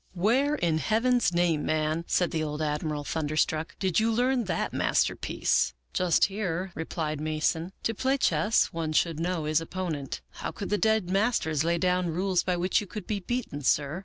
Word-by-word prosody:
" - - -38
' - - -34
Where 275 +7 +3
in 165 - +1
Heaven's 230 - +2
name, 170 -3 +1
man,' 155 +1 0
said 180 - +1
the 160 - -1
old 150 -1 -4
Admiral, 150 -1 -2
thunderstruck, 155 +2 -1
'did 190 -2 +1
you 225 +1 +2
learn 245 +1 +1
that - - -2
masterpiece?' - - +1
" - - -48
' - - -41
Just 180 -2 +3
here,' 190 -2 -3
replied 155 -2 -3
Mason. 155 +3 -1
' - - -40
To 225 - 0
play 265 +5 +1
chess, 220 -4 +2
one 160 -2 -2
should 165 0 +1
know. 175 -1 -1
his 155 +1 +2
opponent. 165 -5 -4 0.2
How - - -2
could 200 - -6
the 210 - +3
dead 220 -5 +2
masters 195 - +1
lay 170 +1 +1
down 180 +1 +1
rules 180 +2 +1
by 180 -1 -1
which 180 +4 +1
you 205 - -7
could 210 0 -7
be 210 -2 -2
beaten, 220 - -3
sir? 145 +4 +1
175 Hz, 200 wpm, -28 LUFS, 155-205 Hz, 0.2 s, Where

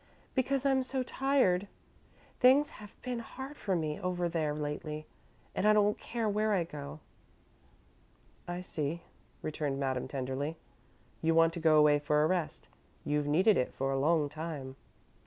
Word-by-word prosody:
"Because 270 +1 0
I'm 270 -1 +4
so 260 0 -2
tired. 250 -9 +2 0.7
Things 270 +4 +5
have 210 - -13
been 250 -2 -2
hard 265 +5 -8
for 195 -9 -1
me 155 -3 -2
over 180 -1 -1
there, 160 -3 -1
lately 150 +1 -4 0.5
and 210 - +1
I 215 - +7
don't 210 0 +3
care 230 -2 -2
where 215 +1 +1
I 185 -4 +2
go." 150 -1 -8 1.5
"I 175 +1 -4
see," 160 0 -3 0.4
returned 150 -3 -2
Madame, 130 -2 -1
tenderly. 135 +4 -3 0.6
"You 165 0 +2
want 165 0 +5
to 170 - -4
go 160 -1 +5
away 150 -1 +6
for 150 +1 +2
a - - +4
rest. 180 -3 -2 0.4
You've 150 0 0
needed 185 +8 +4
it 125 - -1
for 135 +1 -1
a 135 - 0
long 155 +1 +3
time." 150 -3 -6
165 Hz, 155 wpm, -32 LUFS, 150-210 Hz, 1.5 s, I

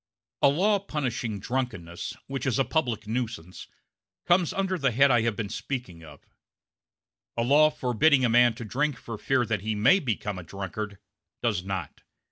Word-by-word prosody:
A - - +7
law 200 +8 +2
punishing 125 - -3
drunkenness, 110 -7 -4
which 135 0 -4
is 125 - +1
a 135 - +2
public 120 -5 -1
nuisance, 110 -6 -4 0.6
comes 175 -1 +3
under 195 -1 -1
the 135 - +2
head 135 +4 +4
I 120 -2 +4
have 115 -2 0
been 110 0 -3
speaking 100 -8 -5
of; 75 -3 -14 1.1
a 115 - +1
law 145 +5 +5
forbidding 130 0 +3
a - - +4
man 120 0 +5
to 120 -1 -7
drink 145 +7 -1
for 115 -3 -8
fear 130 -3 +1
that 110 -3 -1
he 110 +1 -2
may 125 - +5
become 105 - -3
a - - -8
drunkard 100 +3 -6 0.5
does 90 - 0
not. 95 -1 -5
120 Hz, 170 wpm, -27 LUFS, 105-140 Hz, 1.1 s, A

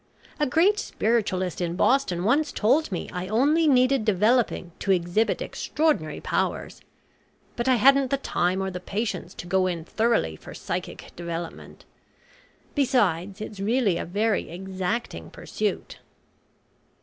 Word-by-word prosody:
A 295 - +2
great 370 +10 +3
spiritualist 195 - -1
in 170 -1 -1
Boston 185 -5 +2
once 285 +9 +2
told 260 +6 +2
me 180 - -3
I 180 +1 -4
only 290 - +3
needed 255 -2 +4
developing 215 -2 +2
to - - -5
exhibit 185 +4 +1
extraordinary 295 - -1
powers. - - -2 0.7
But 240 +1 -2
I 260 - +5
hadn't 275 +3 +5
the 275 - +1
time 185 -7 0
or 190 - -3
the 180 - -5
patience 200 0 -4
to - - -8
go 185 +1 +2
in 170 -3 -3
thoroughly 220 - +1
for - - -11
psychic - - -5
development. 170 -1 -7 0.9
Besides 205 - +1
it's 215 -2 -7
really 210 -3 +1
a - - -3
very 205 +4 0
exacting 190 +6 -4
pursuit." - - -4
210 Hz, 135 wpm, -25 LUFS, 180-255 Hz, 0.9 s, I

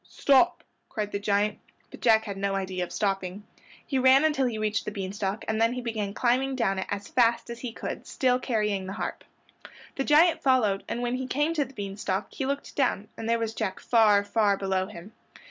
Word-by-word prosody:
stop!" 285 +6 +3 0.3
cried 210 -4 -3
the 200 - -2
giant, 205 +1 0 0.3
but - - -12
Jack 220 -2 +4
had 200 -2 -5
no 195 0 -1
idea 185 -2 -2
of 175 - -7
stopping. 195 -1 -2 0.4
He 270 -4 -1
ran 260 +3 +6
until 275 -4 +2
he 230 -3 -3
reached 215 -1 -1
the - - -4
bean 195 -2 -5
stalk, 200 +1 -3
and 220 0 0
then 230 +1 +3
he 250 - -4
began 215 -4 -3
climbing 260 +2 +1
down 195 -6 0
it 190 - -4
as 205 0 -4
fast 235 -1 +2
as 235 - -7
he 245 -2 -5
could, - - -6
still 255 -1 +1
carrying 210 -6 -1
the 190 - -5
harp. - - -4 0.7
The 270 - 0
giant 315 +4 +4
followed 230 -7 +2
and 240 - -3
when 245 +1 -1
he 260 0 -4
came 295 +5 0
to 300 -3 0
the 265 +1 -16
bean 200 -1 -5
stalk 200 -1 -2
he 265 - -3
looked 280 +1 -4
down, 245 -7 0
and 225 - -5
there 230 - +3
was 225 -1 -3
Jack 205 -4 -3
far, 215 -4 +4
far 205 -1 +2
below 190 -1 -1
him. 195 0 -11
220 Hz, 220 wpm, -27 LUFS, 200-255 Hz, 0.7 s, ran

